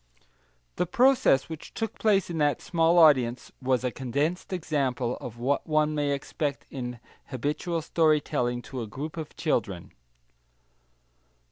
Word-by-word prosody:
The 180 Hz, -, 0 dB
process 245 Hz, -, +4 dB
which 160 Hz, -2 st, -9 dB
took 225 Hz, -1 st, -4 dB
place 200 Hz, -4 st, +2 dB
in 165 Hz, -, -3 dB
that 145 Hz, -1 st, +2 dB
small 170 Hz, 0 st, +2 dB
audience 130 Hz, -7 st, +4 dB
was 130 Hz, -1 st, +1 dB
a 125 Hz, -, 0 dB
condensed 140 Hz, +10 st, -2 dB
example 135 Hz, -8 st, -1 dB
of 120 Hz, -1 st, -7 dB
what 130 Hz, +4 st, -1 dB
one 155 Hz, -1 st, +2 dB
may 145 Hz, -1 st, 0 dB
expect 140 Hz, +1 st, -3 dB
in 125 Hz, -3 st, -5 dB, 0.3 s
habitual 150 Hz, +5 st, -2 dB
story 155 Hz, -1 st, +3 dB
telling 120 Hz, -5 st, -2 dB
to 130 Hz, -3 st, -6 dB
a 115 Hz, -, -5 dB
group 145 Hz, +8 st, -6 dB
of 160 Hz, -2 st, -7 dB
children. 100 Hz, -, -1 dB
145 Hz, 140 wpm, -27 LUFS, 125-165 Hz, 0.3 s, process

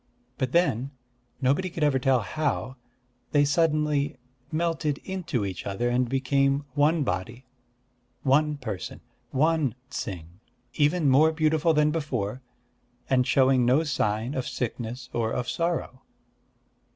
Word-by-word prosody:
But 130 Hz, -2 st, -1 dB
then 140 Hz, -7 st, +2 dB, 0.5 s
nobody 145 Hz, +9 st, +2 dB
could 165 Hz, -2 st, -3 dB
ever 140 Hz, -3 st, +3 dB
tell 130 Hz, -1 st, +3 dB
how 140 Hz, 0 st, -2 dB, 0.6 s
they 145 Hz, -1 st, +5 dB
suddenly 150 Hz, -2 st, +1 dB, 0.3 s
melted 155 Hz, -3 st, 0 dB
into 170 Hz, -, -2 dB
each 95 Hz, 0 st, -5 dB
other, 100 Hz, +5 st, -1 dB
and 125 Hz, 0 st, +1 dB
became 135 Hz, +2 st, +1 dB
one 150 Hz, +3 st, +3 dB
body, 110 Hz, +5 st, -4 dB, 0.8 s
one 150 Hz, +2 st, +3 dB
person, 110 Hz, -9 st, -6 dB, 0.3 s
one 150 Hz, -3 st, +1 dB, 0.2 s
Ts'ing, 90 Hz, -, -6 dB, 0.3 s
even 150 Hz, +1 st, +2 dB
more 145 Hz, +4 st, +5 dB
beautiful 160 Hz, 0 st, +2 dB
than 150 Hz, 0 st, +3 dB
before, 130 Hz, -7 st, -2 dB, 0.7 s
and 125 Hz, -1 st, +3 dB
showing 130 Hz, -1 st, +4 dB
no 130 Hz, +6 st, +4 dB
sign 115 Hz, -4 st, -1 dB
of 130 Hz, -3 st, -3 dB
sickness 120 Hz, 0 st, -4 dB
or 115 Hz, -1 st, 0 dB
of 125 Hz, 0 st, -2 dB
sorrow. 165 Hz, -6 st, -2 dB
135 Hz, 125 wpm, -26 LUFS, 125-155 Hz, 0.8 s, they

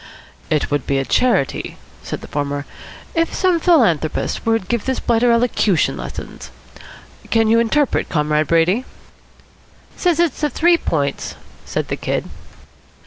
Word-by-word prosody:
"It 155 Hz, -2 st, 0 dB
would 145 Hz, -2 st, -1 dB
be 140 Hz, -, +1 dB
a 135 Hz, -, -1 dB
charity," 235 Hz, -, 0 dB, 0.2 s
said -, -, -6 dB
the -, -, -10 dB
former, 145 Hz, 0 st, -3 dB, 0.5 s
"if 330 Hz, -1 st, 0 dB
some 365 Hz, -3 st, +2 dB
philanthropist 225 Hz, -, +1 dB
would 225 Hz, -4 st, +1 dB
give 235 Hz, -3 st, -1 dB
this 260 Hz, -1 st, -1 dB
blighter 235 Hz, +1 st, +2 dB
elocution 230 Hz, -6 st, +2 dB
lessons. -, -, -8 dB, 0.8 s
Can 225 Hz, -1 st, +3 dB
you 225 Hz, +1 st, +4 dB
interpret, 270 Hz, +5 st, +1 dB
Comrade 150 Hz, -1 st, +1 dB
Brady?" 175 Hz, -, +2 dB, 1.1 s
"Says 350 Hz, -3 st, +1 dB
it's 340 Hz, -5 st, +1 dB
the 300 Hz, -, +2 dB
Three 340 Hz, +5 st, +3 dB
Points," 140 Hz, -3 st, -2 dB, 0.3 s
said -, -, -3 dB
the -, -, -2 dB
Kid. -, -, -2 dB
225 Hz, 140 wpm, -19 LUFS, -, 1.1 s, you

